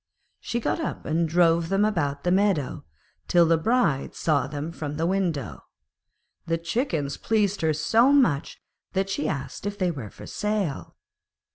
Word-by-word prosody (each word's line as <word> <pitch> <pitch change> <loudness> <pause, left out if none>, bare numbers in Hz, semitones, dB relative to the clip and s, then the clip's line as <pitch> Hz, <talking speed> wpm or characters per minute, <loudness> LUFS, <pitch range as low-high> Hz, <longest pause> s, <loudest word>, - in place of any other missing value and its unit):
She 235 - -3
got 240 - -1
up 320 - -4
and 160 +1 0
drove 165 0 +3
them 195 +2 +3
about 145 -9 -1
the 180 - +1
meadow, 190 -8 +1 0.4
till 175 -1 +5
the 165 0 +4
Bride 165 - +1
saw 145 -5 +1
them 145 +3 -5
from 150 -3 -5
the 165 - 0
window. 175 -6 -1 0.8
The 165 0 +1
chickens 165 - -2
pleased 205 -3 0
her 160 -1 +2
so 225 - +3
much 210 - +2 0.3
that 195 0 0
she 175 - -1
asked 140 +6 -4
if 205 0 -4
they 185 -3 +1
were 130 -10 -7
for - - -12
sale. 210 -8 -3
170 Hz, 160 wpm, -25 LUFS, 150-205 Hz, 0.8 s, till